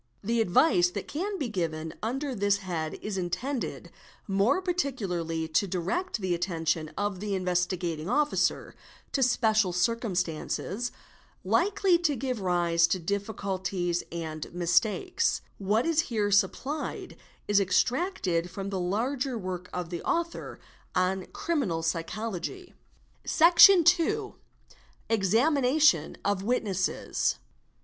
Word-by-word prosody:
The 230 +3 +1
advice 180 - +4
that 195 +2 -6
can 390 +6 -3
be 280 - -2
given' 160 -6 -3
under 265 +5 -2
this 205 -2 +2
head 170 -5 -4
is 205 -2 -3
intended 235 +10 -3 0.4
more 200 - +2
particularly 200 - -2
to 165 +5 +1
direct 195 - -2
the 185 -2 0
attention 165 -3 -1
of 205 -2 -2
the 205 0 -2
Investigating 180 -2 -1
Officer 295 +4 +1 0.4
to 275 - 0
special 220 -6 +3
circumstances 190 +2 -1 0.5
likely 385 -2 +2
to 315 -5 +1
give 255 -3 -3
rise 170 -2 +2
to 170 - 0
difficulties 190 -2 -2
and 160 -2 -5
mistakes, 180 - +1 0.2
What 205 +4 +1
is 330 -2 +1
here 210 -3 0
supplied 220 +9 -1 0.3
is 205 -1 +4
extracted 195 - 0
from 195 +2 -5
the 190 - -2
larger 245 +8 -1
work 185 -3 -5
of 180 -1 -5
the 170 - -4
author 340 0 -3 0.4
on 185 +1 +1
" - - -26
Criminal 235 - -1
Psychology 215 - -4 0.2
" - - -36
©, - - -4
Section 345 +2 +7
II.—Examination 275 - 0
of 200 -2 +1
Witnesses. 200 -4 0
200 Hz, 120 wpm, -28 LUFS, 175-260 Hz, 0.5 s, Section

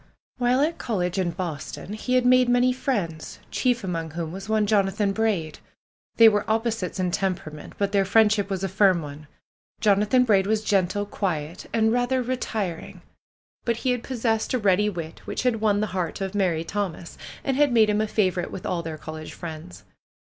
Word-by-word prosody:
While 250 +2 +3
at 320 +3 0
college 185 -4 -1
in 180 -2 +1
Boston 170 +2 -5
he 250 +4 -1
had 250 -1 +3
made 250 0 +5
many 245 +1 +3
friends, 195 - -3
chief 245 -3 +1
among 165 -3 -3
whom 160 0 -5
was 195 +3 -8
one 215 -1 +2
Jonathan 200 -1 +1
Braid. 195 -8 -1 0.6
They 230 - +9
were 205 -1 +3
opposites 220 -4 -1
in 180 -1 0
temperament; 175 -6 -3
but 200 -1 0
their 200 -1 +3
friend 210 +2 +4
ship 205 -1 -1
was 195 -1 -3
a - - +1
firm 190 -3 +3
one. 145 +1 -9 0.5
J 215 - +4
onathan 210 +6 +3
Braid 195 -4 +3
was 215 0 +1
gentle, 200 0 +1
quiet, 175 -5 -3
and 220 -1 +2
rather 245 +1 +1
retiring; 220 -8 -4 0.6
but 235 -1 0
he 255 - +3
had 245 -1 -1
possessed 230 -2 -1
a - - +3
ready 205 -1 +2
wit, 170 -5 -7
which - - -3
had 235 -4 +1
won 205 -2 +2
the - - +1
heart 180 -3 -2
of 195 0 -3
merry 180 -5 +1
Thomas 180 -2 -4 0.3
and 270 - 0
had 290 0 +3
made 225 -2 +5
him 210 0 +1
a 215 - 0
favorite 185 -5 0
with 190 - -8
all 175 -2 -1
their 160 -1 -6
college 155 +1 -8
friends. 155 - -9
205 Hz, 190 wpm, -25 LUFS, 175-225 Hz, 0.6 s, They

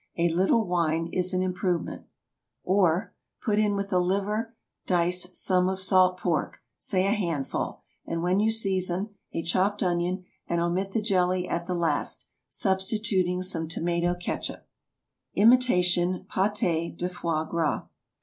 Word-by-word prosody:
A 170 0 +3
little 190 +7 +2
wine 165 -2 0
is 185 0 +1
an 185 0 0
improvement. 180 -1 -2 0.6
Or, 185 +1 +2 0.3
Put 210 -3 0
in 210 -1 +2
with 200 0 -3
the 185 -3 +2
liver 205 +5 -1 0.3
dice 180 0 +1
some 185 -1 +2
of 190 0 -2
salt 185 -1 +4
pork—say 185 +2 -1
a 200 - +2
handful—and 165 -2 -3
when 180 +2 +2
you 215 +1 +3
season, 195 -2 0 0.2
a 165 - -3
chopped 190 +5 +1
onion, 180 +1 -1 0.2
and 170 - 0
omit 180 +3 -1
the 220 - 0
jelly 185 -3 +1
at 170 0 -3
the 180 - -1
last, 165 -4 -1 0.2
substituting 190 -2 0
some 165 -3 -1
tomato 170 +2 0
catsup. 175 0 -5 0.7
IMITATION 185 -6 +4
PÂTÉS 185 -4 0
DE 180 - -1
FOIE 165 -3 -2
GRAS. 165 -1 0
180 Hz, 135 wpm, -27 LUFS, 175-195 Hz, 0.7 s, salt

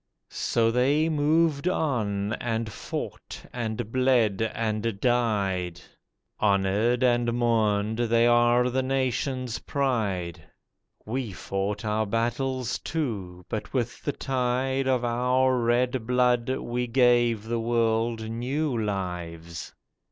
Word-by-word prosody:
So 115 -1 +1
they 140 +6 +2
moved 155 +1 +2
on 110 - 0
and 115 -2 -2
fought - - -6
and 115 -2 -3
bled 125 -6 +2
and 110 -2 -1
died; 100 -8 0 0.6
Honoured 105 +4 +2
and 120 -1 +3
mourned, 110 -2 +1
they 115 0 +3
are 120 +1 +4
the 130 +1 +1
nation's 130 -1 -1
pride. 100 - -1 0.6
We 120 0 -3
fought 100 +5 -3
our 110 0 0
battles, 125 +3 -1
too, 100 - -4
but 110 - -5
with 120 -1 -2
the 145 - -1
tide 130 +1 -1
Of 125 -2 +1
our 125 +2 +2
red 120 0 +1
blood, 125 -1 +2
we 125 -1 -2
gave 120 -3 +3
the 115 +1 -2
world 115 -1 0
new 130 +5 -2
lives. 90 -6 -4
120 Hz, 110 wpm, -26 LUFS, 110-125 Hz, 0.6 s, are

